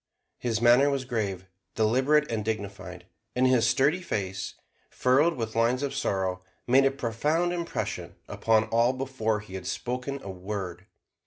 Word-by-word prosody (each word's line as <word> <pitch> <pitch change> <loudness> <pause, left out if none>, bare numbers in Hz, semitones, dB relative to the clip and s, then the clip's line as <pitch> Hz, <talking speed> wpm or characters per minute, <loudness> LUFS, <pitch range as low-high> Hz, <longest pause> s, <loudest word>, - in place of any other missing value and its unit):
His 115 -2 -1
manner 120 +4 +5
was 135 -2 -1
grave, 100 -7 -2 0.3
deliberate 130 +7 +3
and 110 -2 -1
dignified; 100 -5 -5 0.3
and 125 +1 +3
his 125 -2 +4
sturdy 150 +7 +2
face, 95 - -3 0.3
furrowed 145 +7 +3
with 115 -2 -4
lines 120 +4 +2
of 140 - -2
sorrow, 95 -8 -1 0.2
made 135 +3 +5
a - - +5
profound 145 +7 0
impression 110 - -4
upon 110 +2 +2
all 115 +2 +3
before 130 -5 -1
he 105 -3 -13
had 95 - -6
spoken 125 +3 -3
a 100 - -5
word. 95 -1 -6
115 Hz, 150 wpm, -27 LUFS, 100-135 Hz, 0.3 s, manner